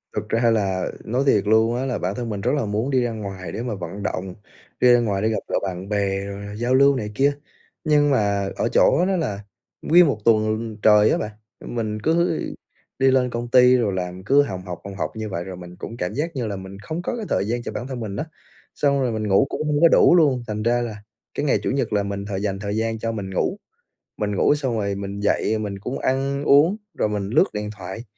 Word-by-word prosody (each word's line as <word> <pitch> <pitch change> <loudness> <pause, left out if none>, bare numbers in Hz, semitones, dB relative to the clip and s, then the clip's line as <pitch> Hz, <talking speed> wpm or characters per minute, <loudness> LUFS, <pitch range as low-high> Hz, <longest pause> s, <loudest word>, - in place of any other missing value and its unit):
Thực - - -3
ra 115 0 +2
là 95 -4 0
nói 125 +5 0
thiệt 105 -7 +3
luôn 110 +2 +3
á 130 +2 -2
là 130 - -1
bản 95 +3 -2
thân 120 0 -4
mình 100 -2 -4
rất - - +1
là 140 - -1
muốn 105 +5 -1
đi 130 - +3
ra 120 - -1
ngoài 100 -4 -6
để 115 - -4
mà 120 -4 -3
vận 95 +2 -7
động, 95 -2 -3 0.4
đi 125 -1 +6
ra 120 - +5
ngoài 100 -4 -1
để 110 - +1
gặp 110 - 0
gỡ - - -2
bạn 95 0 -5
bè 100 -1 -1
rồi 100 +1 -7
giao 120 +3 0
lưu 140 +1 +5
này 105 -5 -4
kia. 140 +4 +3 0.5
Nhưng 145 -2 +3
mà 100 -5 +1
ở - - 0
chỗ 170 +7 +4
đó 195 - +1
là 105 - -2 0.4
nguyên 175 +2 +6
một 135 -7 0
tuần 110 0 +1
trời 105 0 +6
á - - +2
bạn, 105 - -4 0.3
mình 110 -3 -3
cứ 165 +5 +1 0.6
đi 135 0 +4
lên 125 -1 +2
công 120 0 -4
ty 125 +1 +6
rồi 110 -6 0
làm 90 0 -4
cứ 140 +7 +5
hồng 95 -8 -5
hộc, 90 -2 -6
hồng 100 0 -8
hộc 95 - -4
như 110 -1 -4
vậy 85 -2 -3
rồi 95 -1 -8
mình 90 0 -10
cũng 115 +5 -8
cảm 90 +3 -3
giác 155 +5 -3
như 120 -4 -2
là 100 - -3
mình 95 +1 -9
không 155 +11 -5
có 185 - -3
cái 220 - -4
thời - - +1
gian 120 +1 -2
cho - - -5
bản 125 - -5
thân 130 -3 -5
mình 105 -3 -5
á. 150 - -3 0.5
Xong 140 -1 +2
rồi 125 -3 0
mình 110 -1 -2
ngủ 100 +7 +4
cũng 155 - -3
hông 150 +1 +1
có 170 - +8
đủ 170 - +6
luôn, 140 -8 +3
thành 105 0 -3
ra 120 +1 +2
là 105 -3 -6 0.3
cái - - -2
ngày 140 - +2
Chủ - - 0
nhật 135 -4 -1
là 100 - +2
mình 100 0 -4
thời 100 -1 -4
dành 95 -2 -2
thời 100 +1 -3
gian 115 0 -1
cho 115 0 -2
mình 100 -4 -5
ngủ, 185 - 0 0.6
mình 105 -1 -2
ngủ 145 - +3
xong 130 -6 -2
rồi 100 -1 -1
mình 100 0 -5
dậy 105 +1 +1
mình 100 -2 -4
cũng 125 +6 -4
ăn 135 +2 -1
uống 150 +8 +5 0.2
rồi 110 - 0
mình 105 -1 -3
lướt 150 +10 +4
điện 105 0 -3
thoại, 95 +4 -7
110 Hz, 255 wpm, -22 LUFS, 100-130 Hz, 0.6 s, có